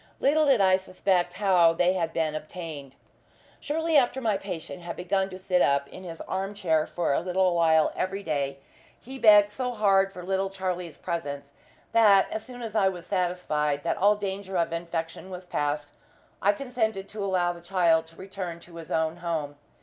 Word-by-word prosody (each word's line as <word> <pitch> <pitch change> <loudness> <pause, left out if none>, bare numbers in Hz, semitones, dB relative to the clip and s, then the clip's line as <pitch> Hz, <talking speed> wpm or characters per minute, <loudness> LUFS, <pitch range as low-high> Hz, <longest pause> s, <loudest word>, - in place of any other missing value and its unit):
Little 300 +2 +3
did 265 -5 +5
I 185 -1 +5
suspect 185 -1 0
how 180 -4 +4
they 175 +2 +2
had 170 -3 -1
been 160 -2 -1
obtained. 155 -3 -7 0.6
Shortly 320 +2 -1
after 260 -1 +2
my 225 -5 +1
patient 185 -2 -6
had 170 -1 -6
begun 190 +2 -1
to 185 - -8
sit 185 -1 +1
up 140 0 +2
in 185 - -11
his 165 -2 -8
arm 195 +2 -4
chair 160 -6 +1
for 175 -5 -1
a - - +2
little 185 +1 +1
while 160 -2 +3
every 195 +2 -2
day, 140 -4 -2 0.4
he 265 +2 -10
begged 210 -2 +7
so 250 +2 -3
hard 195 -3 +3
for 180 -2 -9
little 190 +1 -1
Charlie's 180 -3 -4
presence 140 -5 -5 0.4
that, 205 -4 +6
as 220 - -4
soon 245 -1 -10
as 225 -2 -5
I 200 -3 +3
was 175 -3 -8
satisfied 165 -6 -1
that - - -1
all 205 +2 +4
danger 195 -2 -4
of 170 -1 0
infection 165 +1 -4
was 180 -1 -8
past, 145 -3 -2 0.5
I 205 +2 +4
consented 220 -5 -2
to 210 -1 -5
allow 180 -3 +1
the 170 - -12
child 170 -3 +2
to 165 - -18
return 185 -3 -6
to 170 0 -14
his 165 - -9
own 160 +1 0
home. 160 -4 -3
180 Hz, 190 wpm, -27 LUFS, 165-200 Hz, 0.6 s, begged